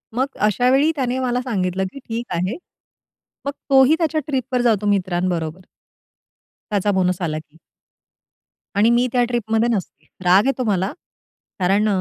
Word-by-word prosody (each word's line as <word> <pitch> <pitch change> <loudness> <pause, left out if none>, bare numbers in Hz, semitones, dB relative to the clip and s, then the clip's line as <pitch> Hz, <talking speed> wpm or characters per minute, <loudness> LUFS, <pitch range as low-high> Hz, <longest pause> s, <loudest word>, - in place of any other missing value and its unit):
मग 260 +2 +1 0.2
अशावेळी 255 +8 +3
त्याने 260 -2 -1
मला 250 -1 0
सांगितलं 190 -7 -1
की 275 - -8
ठीक 235 -1 -5
आहे. 185 +5 -1 0.9
मग 280 - -1 0.2
तोही 270 +2 +6
त्याच्या 315 -1 +1
ट्रिपवर 260 -3 -1
जातो 215 -4 +2
मित्रांबरोबर 180 -3 -1 1.1
त्याचा 205 0 +1
बोनस 185 -1 +1
आला 155 -3 -1
की. 155 0 -19 1.2
आणि 210 +3 +4
मी 240 +1 +3
त्या 245 -1 +3
ट्रिपमध्ये 230 -1 0
नसते. 190 - -6 0.2
राग 185 +4 +5
येतो 270 -1 0
मला. 195 -2 0 0.7
कारण 195 +4 +2
220 Hz, 135 wpm, -21 LUFS, 185-255 Hz, 1.2 s, तोही